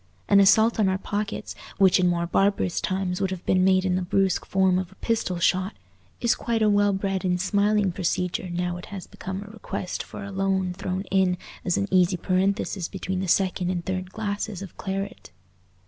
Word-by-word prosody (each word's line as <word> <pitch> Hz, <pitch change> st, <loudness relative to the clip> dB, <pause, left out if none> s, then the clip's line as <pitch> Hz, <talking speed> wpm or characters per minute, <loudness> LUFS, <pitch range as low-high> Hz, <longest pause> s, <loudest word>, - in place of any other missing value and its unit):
An 200 Hz, -, +6 dB
assault 220 Hz, +4 st, +5 dB
on 200 Hz, -3 st, +4 dB
our 190 Hz, -, +1 dB
pockets, 205 Hz, +2 st, -4 dB, 0.2 s
which 190 Hz, -1 st, +5 dB
in 180 Hz, -, +3 dB
more 170 Hz, -1 st, +1 dB
barbarous 195 Hz, 0 st, +1 dB
times 185 Hz, 0 st, -1 dB
would 195 Hz, -, +1 dB
have 185 Hz, -2 st, -6 dB
been 185 Hz, 0 st, +3 dB
made 185 Hz, 0 st, +4 dB
in 185 Hz, -, +1 dB
the 185 Hz, -, 0 dB
brusque 190 Hz, +1 st, +1 dB
form 190 Hz, -1 st, +3 dB
of 185 Hz, -1 st, -5 dB
a -, -, -17 dB
pistol 220 Hz, -5 st, -1 dB
shot, 185 Hz, +2 st, +1 dB, 0.4 s
is 235 Hz, -, +3 dB
quite 230 Hz, -2 st, -1 dB
a 215 Hz, -, +4 dB
well 205 Hz, 0 st, +4 dB
bred 195 Hz, 0 st, -1 dB
and 180 Hz, -1 st, +1 dB
smiling 205 Hz, +1 st, +2 dB
procedure 180 Hz, 0 st, -2 dB
now 175 Hz, 0 st, -2 dB
it 175 Hz, -, -9 dB
has 195 Hz, -3 st, -7 dB
become 190 Hz, +1 st, -6 dB
a 205 Hz, -, -12 dB
request 205 Hz, -4 st, -5 dB
for -, -, -8 dB
a 200 Hz, -, -7 dB
loan 190 Hz, -1 st, 0 dB
thrown 185 Hz, +1 st, -3 dB
in 185 Hz, -2 st, +3 dB, 0.3 s
as 175 Hz, -, +1 dB
an 200 Hz, -, 0 dB
easy 180 Hz, -1 st, +4 dB
parenthesis 190 Hz, 0 st, 0 dB
between 190 Hz, -1 st, -4 dB
the 190 Hz, -, -2 dB
second 185 Hz, 0 st, +1 dB
and 175 Hz, -2 st, -2 dB
third 185 Hz, 0 st, -3 dB
glasses 205 Hz, -2 st, -3 dB
of 190 Hz, -, -10 dB
claret. 195 Hz, 0 st, -5 dB
190 Hz, 200 wpm, -25 LUFS, 180-200 Hz, 0.4 s, An